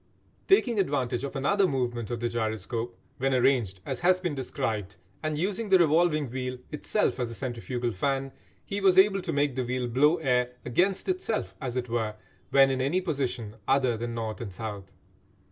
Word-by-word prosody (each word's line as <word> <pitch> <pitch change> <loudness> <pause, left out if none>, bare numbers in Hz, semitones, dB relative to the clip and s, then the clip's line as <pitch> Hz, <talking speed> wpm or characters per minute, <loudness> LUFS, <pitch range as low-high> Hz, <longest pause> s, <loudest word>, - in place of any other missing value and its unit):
Taking 245 - +4
advantage 130 -8 0
of 140 - -4
another 190 +9 +3
movement 120 - -2
of 120 - -3
the 120 - 0
gyroscope 115 +1 -3 0.2
when 135 0 +2
arranged 120 -8 +2
as - - -3
has 180 +1 +4
been 175 -4 -2
described, 110 -7 -3 0.3
and 155 -1 -2
using 200 +6 -1
the 190 - +7
revolving 155 -4 +3
wheel 125 0 -3
itself 155 +3 0
as 120 -2 -1
a 115 - -7
centrifugal 120 -1 -3
fan, 135 +6 -1 0.3
he 200 +1 -3
was 190 -2 +4
able 195 0 +6
to 175 -2 -3
make 145 -2 +1
the 130 - 0
wheel 125 0 -2
blow 145 +7 +4
air 125 -4 +1
"against 180 +11 +1
itself," 365 - -1
as 130 -2 -3
it 125 -1 -2
were, 110 -2 -1 0.3
when 135 -1 +6
in 130 -1 -1
any 140 +8 +1
position 130 - -3
other 130 -3 +3
than 120 +1 -4
north 110 -3 -4
and 100 -5 -6
south. 100 -1 -6
130 Hz, 180 wpm, -28 LUFS, 120-160 Hz, 0.3 s, the